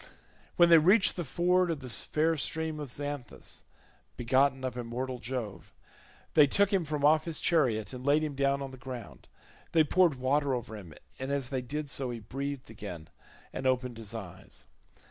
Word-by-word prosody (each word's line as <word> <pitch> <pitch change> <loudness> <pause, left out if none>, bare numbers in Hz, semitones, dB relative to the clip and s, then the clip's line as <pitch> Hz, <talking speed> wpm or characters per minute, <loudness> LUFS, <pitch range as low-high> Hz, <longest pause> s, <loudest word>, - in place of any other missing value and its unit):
When 175 -1 +6
they 165 -1 +9
reached 190 +6 +4
the 175 - -2
ford 180 +4 +2
of 165 -3 -1
the 130 - -7
fair 155 +6 0
stream 160 +1 -2
of 145 -3 -5
Xanthus, 145 0 -6 0.5
begotten 130 +2 +2
of 130 -1 -3
Immortal 125 +1 -4
Jove, 115 -6 -5 0.6
they 150 -2 +7
took 200 +7 +3
him 185 -4 +2
from 150 -1 -1
off 155 +1 +5
his 165 -3 -3
chariot 125 -10 +1
and 125 0 -7
laid 145 +3 +3
him 150 -2 -2
down 140 0 +1
on 135 - -6
the 130 - -10
ground; 120 - -8 0.5
they 160 -1 +6
poured 170 0 +3
water 135 +1 +1
over 115 -2 -5
him, 90 -7 -10 0.2
and 130 +1 -4
as 140 -3 -2
they 130 -2 -1
did 145 +4 -4
so 135 -3 -1
he 120 - -4
breathed 135 +3 -5
again 90 -7 -8 0.4
and 130 - -2
opened 125 -2 0
his 115 0 -8
eyes. 95 -4 -10
135 Hz, 185 wpm, -30 LUFS, 120-155 Hz, 0.6 s, they